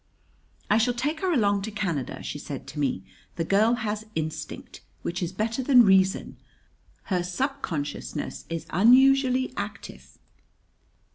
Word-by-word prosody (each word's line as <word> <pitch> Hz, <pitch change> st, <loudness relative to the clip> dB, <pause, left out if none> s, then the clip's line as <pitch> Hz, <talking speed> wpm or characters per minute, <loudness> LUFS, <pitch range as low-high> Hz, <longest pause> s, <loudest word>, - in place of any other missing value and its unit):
"I 210 Hz, +2 st, +3 dB
shall 240 Hz, +2 st, +1 dB
take 295 Hz, +6 st, -2 dB
her 375 Hz, -1 st, 0 dB
along 205 Hz, -, +2 dB
to 210 Hz, -, -4 dB
Canada," 185 Hz, -, -3 dB
she -, -, -5 dB
said -, -, -7 dB
to -, -, -7 dB
me. 130 Hz, -10 st, -1 dB, 0.3 s
"The 165 Hz, -, -1 dB
girl 215 Hz, +6 st, +3 dB
has 215 Hz, -2 st, -4 dB
instinct, 155 Hz, -1 st, -5 dB, 0.2 s
which 175 Hz, +2 st, -3 dB
is 175 Hz, -1 st, -2 dB
better 225 Hz, +6 st, -2 dB
than 250 Hz, -2 st, +6 dB
reason. 190 Hz, 0 st, +2 dB, 0.8 s
Her 180 Hz, -, +2 dB
subconsciousness 180 Hz, -, -4 dB
is 165 Hz, -1 st, -4 dB
unusually 260 Hz, -, +4 dB
active." 200 Hz, 0 st, -7 dB
210 Hz, 135 wpm, -26 LUFS, 175-250 Hz, 0.8 s, than